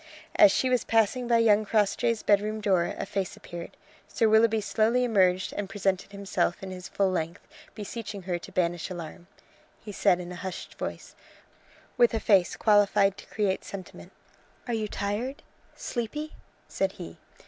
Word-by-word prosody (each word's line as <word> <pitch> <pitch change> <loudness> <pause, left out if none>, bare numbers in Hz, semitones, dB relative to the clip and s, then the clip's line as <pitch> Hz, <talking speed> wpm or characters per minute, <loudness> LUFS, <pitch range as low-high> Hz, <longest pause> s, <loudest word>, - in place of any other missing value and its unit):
As 310 -2 +8
she 260 - +1
was 250 -2 +2
passing 230 +2 +1
by 235 -1 +4
young 215 -2 +4
Crossjay's 215 +1 +1
bedroom 210 +1 +2
door 190 -5 +1
a - - -3
face 195 -1 -3
appeared. 170 0 -9 0.3
Sir 225 - +1
Willoughby 220 0 +4
slowly 225 +4 +1
emerged 190 -5 +2
and 205 -2 -4
presented 195 -1 -1
himself 195 -3 -1
in 190 - -6
his 180 -1 -7
full 195 -1 +1
length, 170 +1 -4 0.3
beseeching 205 -2 -6
her 175 -1 -2
to - - -11
banish 175 -1 -1
alarm. 175 -1 -8 0.5
He 210 - -9
said 180 - +3
it - - -5
in 175 - -8
a - - -6
hushed 190 -1 -6
voice, - - -6 0.8
with 240 -2 +4
a - - 0
face 195 -5 +3
qualified 205 -2 +3
to - - -12
create 200 -3 -1
sentiment. 190 -2 -9 0.6
"Are 240 - -2
you 220 -1 -1
tired? 210 +7 -3 0.3
sleepy?" 295 +6 -4 0.3
said 195 0 -1
he. 80 - -10
205 Hz, 165 wpm, -27 LUFS, 185-225 Hz, 0.8 s, As